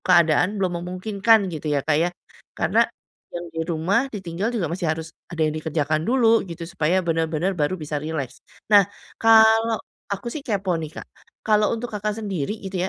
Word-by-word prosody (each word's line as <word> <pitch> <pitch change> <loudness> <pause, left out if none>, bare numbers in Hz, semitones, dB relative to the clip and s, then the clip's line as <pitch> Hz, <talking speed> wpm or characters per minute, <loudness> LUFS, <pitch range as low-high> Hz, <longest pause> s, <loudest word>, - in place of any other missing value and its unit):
keadaan 175 +3 +3
belum 180 -3 -1
memungkinkan 195 +3 +2
gitu 155 -1 -5
ya 145 -2 0
Kak 155 -1 +2
ya. 170 - +2 0.5
Karena - - +2 0.5
yang 175 - -4
di 165 - -3
rumah 185 +10 +1
ditinggal 190 -3 -3
juga 170 -8 -1
masih 175 -1 -2
harus 160 0 -3 0.2
ada 165 -2 -1
yang 155 - +1
dikerjakan 155 0 -1
dulu 230 -3 +4
gitu 170 0 -6
supaya 180 +1 0
bener-bener 165 +2 0
baru 170 +1 -1
bisa 150 -3 -4
rileks. 150 -4 -5 0.3
Nah 200 -2 +7 0.3
kalau 225 0 +6 0.3
aku 205 +4 -4
sih 305 - -5
kepo 200 -8 -1
nih 160 +2 -7
Kak. - - -15 0.4
Kalau 210 -1 +3
untuk 235 +1 -6
Kakak 210 0 -2
sendiri 205 -3 -3
gitu 190 -1 -2
180 Hz, 170 wpm, -23 LUFS, 160-210 Hz, 0.5 s, Nah